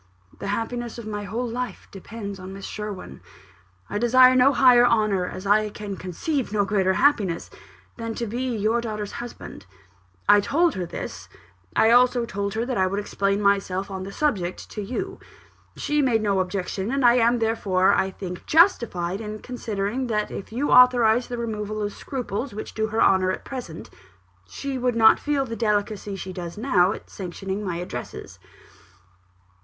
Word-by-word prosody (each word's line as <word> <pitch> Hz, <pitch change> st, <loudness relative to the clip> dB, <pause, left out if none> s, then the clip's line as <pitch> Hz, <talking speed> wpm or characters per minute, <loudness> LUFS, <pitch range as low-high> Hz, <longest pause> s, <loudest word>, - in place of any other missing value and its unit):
The -, -, -5 dB
happiness 230 Hz, +3 st, -3 dB
of 235 Hz, -, -8 dB
my 205 Hz, -1 st, -4 dB
whole 230 Hz, +5 st, -3 dB
life 245 Hz, +1 st, -5 dB
depends 200 Hz, 0 st, -8 dB
on 185 Hz, +1 st, -8 dB
Miss 195 Hz, 0 st, -8 dB
Sherwin; 205 Hz, -, -7 dB, 0.7 s
I 205 Hz, -, -3 dB
desire 255 Hz, +2 st, +6 dB
no 255 Hz, +2 st, +6 dB
higher 250 Hz, -3 st, +6 dB
honour, 215 Hz, -6 st, +2 dB
as 185 Hz, +2 st, -7 dB
I 210 Hz, +1 st, +3 dB
can 205 Hz, -1 st, -6 dB
conceive 215 Hz, -, -3 dB
no 205 Hz, -1 st, +1 dB
greater 190 Hz, -2 st, +1 dB
happiness, 205 Hz, -, +1 dB, 0.5 s
than 230 Hz, -1 st, -4 dB
to 235 Hz, -, -3 dB
be 240 Hz, +4 st, -3 dB
your 220 Hz, +3 st, +1 dB
daughter's 215 Hz, -3 st, -4 dB
husband. 235 Hz, -, -9 dB, 0.6 s
I 205 Hz, -, +7 dB
told 320 Hz, +11 st, +2 dB
her 180 Hz, -2 st, -4 dB
this: -, -, -7 dB, 0.5 s
I 220 Hz, -, +5 dB
also 245 Hz, 0 st, +4 dB
told 200 Hz, -1 st, -3 dB
her 230 Hz, +2 st, -1 dB
that 250 Hz, -5 st, -2 dB
I 185 Hz, -, +3 dB
would 195 Hz, +2 st, -2 dB
explain 200 Hz, 0 st, -1 dB
myself 195 Hz, -1 st, +1 dB
on 190 Hz, -1 st, -5 dB
the 190 Hz, +1 st, -6 dB
subject 195 Hz, -11 st, -2 dB
to 210 Hz, -, -5 dB
you. 370 Hz, -, -4 dB, 0.6 s
She 295 Hz, 0 st, 0 dB
made 235 Hz, -5 st, +2 dB
no 200 Hz, -2 st, +1 dB
objection; 190 Hz, +2 st, -2 dB
and 275 Hz, 0 st, +1 dB
I 240 Hz, +1 st, +6 dB
am, 235 Hz, +1 st, +3 dB
therefore, 210 Hz, -5 st, +2 dB
I 190 Hz, -, +1 dB
think, 185 Hz, -2 st, -8 dB
justified 225 Hz, -, +3 dB
in 215 Hz, -1 st, -5 dB
considering 230 Hz, +1 st, -3 dB
that 210 Hz, -2 st, -1 dB
if 195 Hz, -, -7 dB
you 260 Hz, +6 st, -1 dB
authorised 245 Hz, -2 st, +5 dB
the 245 Hz, -, -4 dB
removal 215 Hz, -2 st, -4 dB
of 205 Hz, -1 st, -2 dB
scruples 250 Hz, -2 st, -5 dB
which 215 Hz, -, -6 dB
do 220 Hz, 0 st, -1 dB
her 220 Hz, +1 st, +1 dB
honour 190 Hz, -1 st, +4 dB
at 185 Hz, -, -3 dB
present, 245 Hz, -12 st, -7 dB, 0.6 s
she 275 Hz, -, -5 dB
would 250 Hz, -1 st, 0 dB
not 220 Hz, -1 st, +6 dB
feel 290 Hz, -2 st, 0 dB
the 230 Hz, -2 st, -5 dB
delicacy 210 Hz, -2 st, -1 dB
she 185 Hz, 0 st, -7 dB
does 175 Hz, 0 st, -7 dB
now 200 Hz, -6 st, +3 dB
at -, -, -7 dB
sanctioning 195 Hz, +2 st, -5 dB
my 180 Hz, -4 st, -3 dB
addresses." 170 Hz, -8 st, -7 dB
215 Hz, 175 wpm, -24 LUFS, 195-240 Hz, 0.7 s, I